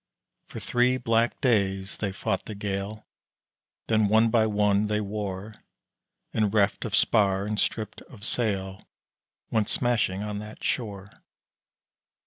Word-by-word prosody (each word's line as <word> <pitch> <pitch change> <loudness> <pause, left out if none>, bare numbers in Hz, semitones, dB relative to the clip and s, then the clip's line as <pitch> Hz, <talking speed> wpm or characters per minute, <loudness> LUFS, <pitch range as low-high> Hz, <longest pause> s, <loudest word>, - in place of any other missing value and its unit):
For - - -7
three 125 +1 +2
black 115 -1 +1
days 100 -5 +1
they 100 -2 -2
fought 95 0 -2
the 110 - -6
gale, 100 +1 -4 0.8
Then 110 -2 +3
one 110 +2 +4
by 110 -2 +4
one 105 0 +2
they 105 0 0
wore 105 0 -4 0.8
And 105 -2 +2
reft 105 +1 +2
of 110 -2 -1
spar 100 -4 +3
and 105 0 -2
stripped 110 -2 -2
of 105 -4 -10
sail 95 -6 -1 0.6
Went 110 -2 +1
smashing 110 -6 +1
on 105 -1 -4
that 105 +1 -10
shore. 100 -5 -3
105 Hz, 130 wpm, -27 LUFS, 100-110 Hz, 0.8 s, one